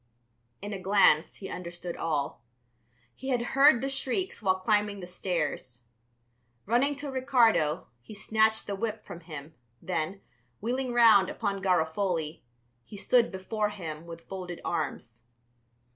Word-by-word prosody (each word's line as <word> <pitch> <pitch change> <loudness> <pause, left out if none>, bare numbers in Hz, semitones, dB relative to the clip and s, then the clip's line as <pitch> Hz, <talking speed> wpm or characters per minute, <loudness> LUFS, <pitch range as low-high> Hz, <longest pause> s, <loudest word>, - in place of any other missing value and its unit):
In 205 +1 -4
a 195 - -4
glance, 190 -5 +4
he 195 - -8
understood 175 -1 -6
all. 150 -6 -2 0.7
He 265 - -7
had 245 -2 +1
heard 275 -2 +6
the 270 - -1
shrieks 275 +7 -2
while 190 -3 +3
climbing 205 +1 +1
the 180 - -7
stairs. 165 -9 -3 0.8
Running 250 +7 +2
to 285 0 -5
Ricardo, 245 - +3 0.2
he 210 - -11
snatched 220 +1 +2
the 200 - -3
whip 220 +1 -4
from 170 - -8
him, 155 -2 -9 0.3
then, 185 +2 -3 0.4
wheeling 250 +3 -2
round 225 -5 +6
upon 200 -3 -2
Garofoli, 170 -2 0 0.4
he 205 - -11
stood 235 +3 +3
before 210 +3 -2
him 165 -5 -7
with 165 0 -10
folded 180 -3 -6
arms. 125 -8 -4
195 Hz, 135 wpm, -29 LUFS, 170-230 Hz, 0.8 s, heard